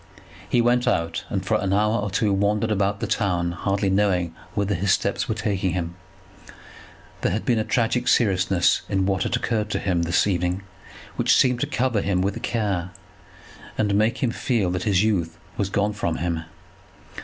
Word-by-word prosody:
He 120 Hz, -, +3 dB
went 120 Hz, +1 st, +2 dB
out, 85 Hz, -1 st, 0 dB
and -, -, -2 dB
for -, -, +1 dB
an 95 Hz, -, -1 dB
hour 105 Hz, +2 st, +2 dB
or 105 Hz, 0 st, -2 dB
two 100 Hz, +1 st, +1 dB
wandered 105 Hz, +3 st, +1 dB
about 100 Hz, 0 st, 0 dB
the -, -, 0 dB
town, 90 Hz, -4 st, 0 dB
hardly 100 Hz, +2 st, -1 dB
knowing 95 Hz, -4 st, +1 dB, 0.2 s
whither 100 Hz, 0 st, 0 dB
his 95 Hz, +2 st, 0 dB
steps -, -, 0 dB
were 110 Hz, -, 0 dB
taking 100 Hz, -4 st, -1 dB
him. 85 Hz, -2 st, -3 dB, 1.3 s
There -, -, +1 dB
had 105 Hz, +5 st, -2 dB
been 120 Hz, -3 st, +2 dB
a -, -, +1 dB
tragic 120 Hz, +2 st, 0 dB
seriousness 95 Hz, -5 st, +3 dB
in 95 Hz, -1 st, +1 dB
what 95 Hz, -1 st, 0 dB
had 120 Hz, -, 0 dB
occurred 110 Hz, -3 st, -1 dB
to -, -, -1 dB
him 90 Hz, -3 st, 0 dB
this 85 Hz, +1 st, +2 dB
evening, 90 Hz, -1 st, -1 dB, 0.5 s
which -, -, +4 dB
seemed 125 Hz, -2 st, +3 dB
to 145 Hz, -, 0 dB
cover 125 Hz, -6 st, 0 dB
him 95 Hz, -2 st, 0 dB
with 100 Hz, +1 st, -2 dB
care, 100 Hz, -6 st, -1 dB, 0.9 s
and 105 Hz, -2 st, +1 dB
make 110 Hz, +5 st, +1 dB
him 120 Hz, -, +2 dB
feel 115 Hz, -7 st, 0 dB
that 90 Hz, -, -3 dB
his 95 Hz, -1 st, +3 dB
youth 85 Hz, -7 st, 0 dB, 0.2 s
was 100 Hz, -2 st, -1 dB
gone 100 Hz, +1 st, 0 dB
from 85 Hz, -6 st, -2 dB
him. 85 Hz, -1 st, -2 dB
100 Hz, 185 wpm, -23 LUFS, 90-110 Hz, 1.3 s, which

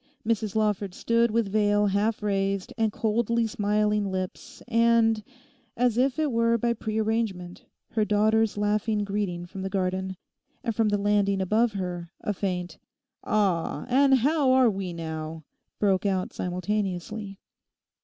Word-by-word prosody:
Mrs 220 Hz, -2 st, 0 dB
Lawford 210 Hz, -3 st, 0 dB
stood 230 Hz, 0 st, +2 dB
with 220 Hz, -2 st, 0 dB
veil 205 Hz, 0 st, +3 dB
half 205 Hz, +2 st, 0 dB
raised 195 Hz, +2 st, -1 dB
and 225 Hz, -3 st, +1 dB
coldly 230 Hz, +2 st, 0 dB
smiling 210 Hz, -1 st, 0 dB
lips 185 Hz, -1 st, -5 dB
and, 230 Hz, -2 st, +3 dB, 0.5 s
as 245 Hz, -1 st, +2 dB
if 255 Hz, +3 st, +2 dB
it 310 Hz, -3 st, +1 dB
were 230 Hz, 0 st, +2 dB
by 235 Hz, +1 st, +1 dB
pre 220 Hz, -1 st, -4 dB
arrangement, 215 Hz, -5 st, -2 dB, 0.3 s
her 215 Hz, -, +1 dB
daughter's 215 Hz, +1 st, +2 dB
laughing 210 Hz, +1 st, 0 dB
greeting 195 Hz, -4 st, -2 dB
from 190 Hz, +2 st, -8 dB
the 190 Hz, -, -3 dB
garden, 190 Hz, -1 st, -2 dB, 0.5 s
and 230 Hz, -3 st, -2 dB
from 225 Hz, -1 st, +2 dB
the 205 Hz, -, +1 dB
landing 200 Hz, -1 st, +2 dB
above 215 Hz, +4 st, +2 dB
her, 180 Hz, -3 st, -4 dB
a 210 Hz, -, -1 dB
faint 180 Hz, -4 st, -3 dB, 0.4 s
'Ah, 185 Hz, -8 st, 0 dB
and 270 Hz, +2 st, +5 dB
how 280 Hz, +2 st, +2 dB
are 255 Hz, -3 st, +5 dB
we 190 Hz, -2 st, -4 dB
now?' 160 Hz, -1 st, -6 dB, 0.3 s
broke 195 Hz, -1 st, +2 dB
out 190 Hz, -2 st, -1 dB
simultaneously. 195 Hz, +2 st, -3 dB
210 Hz, 145 wpm, -26 LUFS, 190-225 Hz, 0.5 s, and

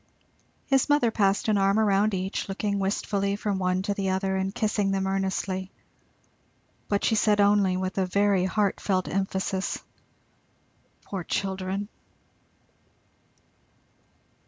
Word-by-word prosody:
His 270 Hz, +1 st, +2 dB
mother 290 Hz, -6 st, +3 dB
passed 200 Hz, -1 st, +1 dB
an 210 Hz, -2 st, +3 dB
arm 195 Hz, +1 st, +3 dB
round 210 Hz, -1 st, +3 dB
each, 190 Hz, +1 st, -3 dB
looking 200 Hz, +1 st, -1 dB
wistfully 200 Hz, 0 st, -1 dB
from 205 Hz, -1 st, -2 dB
one 185 Hz, 0 st, 0 dB
to 205 Hz, 0 st, -1 dB
the 195 Hz, -1 st, -2 dB
other 190 Hz, 0 st, 0 dB
and 190 Hz, 0 st, -1 dB
kissing 210 Hz, -1 st, 0 dB
them 195 Hz, 0 st, 0 dB
earnestly, 190 Hz, -1 st, -2 dB, 1.2 s
but 205 Hz, -1 st, 0 dB
she -, -, +2 dB
said 210 Hz, -1 st, +3 dB
only, 200 Hz, -2 st, +4 dB
with 185 Hz, +1 st, -2 dB
a 190 Hz, -, +1 dB
very 200 Hz, 0 st, +2 dB
heart 200 Hz, +1 st, 0 dB
felt 185 Hz, -2 st, 0 dB
emphasis, 190 Hz, 0 st, -1 dB, 1.3 s
"Poor 190 Hz, -3 st, -5 dB
children!" 190 Hz, +2 st, -2 dB
195 Hz, 125 wpm, -26 LUFS, 190-205 Hz, 1.3 s, only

